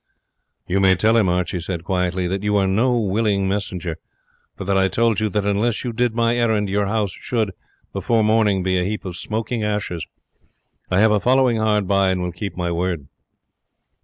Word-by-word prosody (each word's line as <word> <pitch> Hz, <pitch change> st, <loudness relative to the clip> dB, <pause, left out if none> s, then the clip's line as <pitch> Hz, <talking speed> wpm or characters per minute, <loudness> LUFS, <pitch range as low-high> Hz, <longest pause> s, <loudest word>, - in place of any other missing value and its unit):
"You 95 Hz, +2 st, 0 dB
may 95 Hz, -1 st, +5 dB
tell 110 Hz, +5 st, +2 dB
him," 105 Hz, -5 st, +3 dB
Archie 90 Hz, 0 st, -1 dB
said 85 Hz, -1 st, -4 dB
quietly, 90 Hz, 0 st, -1 dB
"that 95 Hz, +2 st, -2 dB
you 105 Hz, 0 st, 0 dB
are 100 Hz, -, +2 dB
no 120 Hz, +6 st, +2 dB
willing 100 Hz, -1 st, +1 dB
messenger; 90 Hz, -4 st, -3 dB, 0.6 s
for -, -, -6 dB
that 100 Hz, +1 st, +1 dB
I 95 Hz, 0 st, +3 dB
told 110 Hz, +2 st, +1 dB
you 110 Hz, -1 st, 0 dB
that 105 Hz, 0 st, -1 dB
unless 105 Hz, +3 st, 0 dB
you 120 Hz, -2 st, -3 dB
did 120 Hz, 0 st, 0 dB
my 115 Hz, 0 st, +2 dB
errand 110 Hz, -4 st, +1 dB
your 100 Hz, 0 st, +1 dB
house 105 Hz, -1 st, 0 dB
should, 110 Hz, 0 st, -2 dB, 0.4 s
before 115 Hz, -2 st, +1 dB
morning, 105 Hz, -3 st, +2 dB
be 95 Hz, 0 st, +1 dB
a -, -, 0 dB
heap 105 Hz, +3 st, -3 dB
of 90 Hz, -2 st, -5 dB
smoking 110 Hz, +4 st, -3 dB
ashes. 105 Hz, -5 st, -2 dB, 0.8 s
I 90 Hz, +2 st, +2 dB
have 110 Hz, 0 st, +5 dB
a 105 Hz, -, +3 dB
following 125 Hz, 0 st, +3 dB
hard 105 Hz, -2 st, +1 dB
by, 100 Hz, -1 st, +3 dB
and 95 Hz, -1 st, 0 dB
will 90 Hz, -, -2 dB
keep 85 Hz, +1 st, -6 dB
my 90 Hz, -1 st, -1 dB
word." 85 Hz, -4 st, -2 dB
100 Hz, 195 wpm, -21 LUFS, 95-110 Hz, 0.8 s, may